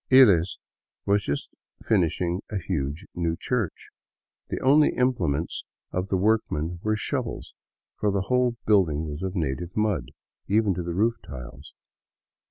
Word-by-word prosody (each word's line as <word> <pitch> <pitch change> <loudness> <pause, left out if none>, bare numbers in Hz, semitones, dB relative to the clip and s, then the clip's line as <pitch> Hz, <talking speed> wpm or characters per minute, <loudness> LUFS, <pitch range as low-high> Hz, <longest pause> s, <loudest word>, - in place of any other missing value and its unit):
lies 100 -10 +6 0.5
was 100 0 +3
just 70 -4 -3 0.4
finishing 90 -2 +1
a 105 - -2
huge 85 -2 -3
new 85 -1 -1
church. 120 -8 -2 0.6
The - - -2
only 145 +3 +5
implements 90 - 0 0.3
of 90 +1 -2
the 95 - +1
workmen 90 -5 +1
were 110 +1 +1
shovels, 120 +2 -3 0.5
for 105 - +2
the 100 -1 +1
whole 125 +3 +2
building 85 -8 +3
was 75 +2 -5
of 95 0 -3
native 85 +2 -2
mud, 105 -2 0 0.4
even 105 -1 +3
to 90 - -3
the 85 0 -4
roof 115 +4 +2
tiles. 65 -4 -10
95 Hz, 140 wpm, -26 LUFS, 85-110 Hz, 0.6 s, lies